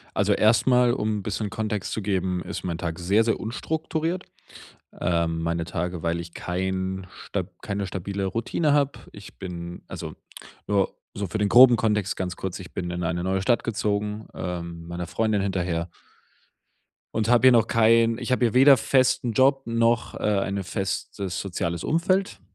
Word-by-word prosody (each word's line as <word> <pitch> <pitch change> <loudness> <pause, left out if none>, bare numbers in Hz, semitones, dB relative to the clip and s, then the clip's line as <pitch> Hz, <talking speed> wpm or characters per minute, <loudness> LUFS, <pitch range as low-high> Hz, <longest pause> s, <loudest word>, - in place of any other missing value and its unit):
Also - - +2
erstmal, 120 +2 +4
um 110 -4 -1
'n - - -6
bisschen 105 +2 -3
Kontext 105 -2 -3
zu 110 - -2
geben, 95 -2 -1
ist - - -6
mein 85 -2 -2
Tag 85 -1 -4
sehr 100 +6 +3
sehr 115 - +1
unstrukturiert. 160 +8 -3 0.8
Ähm, 85 -1 0
meine 85 0 -1
Tage, 90 -1 -4
weil 85 0 0
ich 85 0 -8
kein 95 +1 -3 0.2
stab 95 -3 -3
keine 100 -2 -3
stabile 95 +2 -4
Routine 115 - 0
habe. 145 -1 +1
Ich 100 -1 -13
bin 85 -2 -7
also - - -6 0.5
nur 100 -2 +1 0.2
so 100 -1 -3
für 110 - -3
den 105 -1 +1
groben 125 +1 +8
Kontext 105 -4 0
ganz 90 -1 -3
kurz, 95 -1 -5
ich 90 - -11
bin 90 -2 -3
in 90 0 -3
eine 85 +1 -1
neue 95 +1 0
Stadt 120 +5 +2
gezogen, 105 -1 -2
ähm, 85 -2 -5
meiner 85 0 -5
Freundin 110 +2 0
hinterher 90 -3 -1 1.3
und 110 0 0
habe 120 +2 +5
hier 130 - +7
noch 115 -2 +4
kein 115 +1 +4
ich - - -3
habe 125 - +2
hier 110 - -2
weder 135 +2 +8
festen 130 -1 +2
Job 135 +4 +3
noch, 115 0 +1
äh, - - -6 0.2
eine 100 0 -2
festes 95 -1 -3
soziales 85 -3 -3
Umfeld 185 +5 +1
100 Hz, 170 wpm, -25 LUFS, 90-115 Hz, 1.3 s, groben